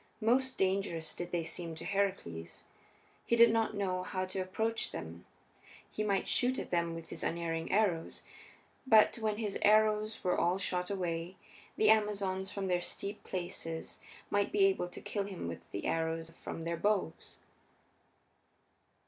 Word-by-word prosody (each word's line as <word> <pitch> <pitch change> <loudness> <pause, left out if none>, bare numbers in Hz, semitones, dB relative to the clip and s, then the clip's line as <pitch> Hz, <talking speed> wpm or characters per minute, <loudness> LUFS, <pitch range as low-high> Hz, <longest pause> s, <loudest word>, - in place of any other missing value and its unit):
Most 255 +4 +2
dangerous 185 -4 0
did 175 0 -5
they 175 -1 0
seem 165 0 -3
to - - -7
Heracles. 185 - -2 0.6
He 235 - +2
did 235 -1 +7
not 225 -1 +1
know 185 -2 0
how 185 0 -2
to 185 +1 -4
approach 220 +5 -1
them; 85 +2 -7 0.6
he 215 - -2
might 200 -2 +1
shoot 255 +1 +2
at - - -5
them 170 -1 +1
with 165 0 -8
his - - -5
unerring 165 -1 -2
arrows, 190 -5 +1 0.6
but 220 -2 +6
when 215 -2 0
his 210 -3 -2
arrows 215 +1 +3
were 180 - +2
all 175 +2 +2
shot 180 -2 -1
away, 175 -2 -2 0.4
the 215 0 +6
Amazons, 200 -3 +1
from 200 -1 -3
their 180 -1 +1
steep 200 +3 -4
places, 165 -3 -5 0.3
might 205 0 +2
be 395 0 +5
able 385 - +2
to 180 - -10
kill 200 -2 -2
him 190 - -5
with 85 - -7
the 100 - -5
arrows 165 0 -1
from 165 - -5
their 170 0 -2
bows. 195 -3 -1
190 Hz, 155 wpm, -33 LUFS, 170-215 Hz, 0.6 s, did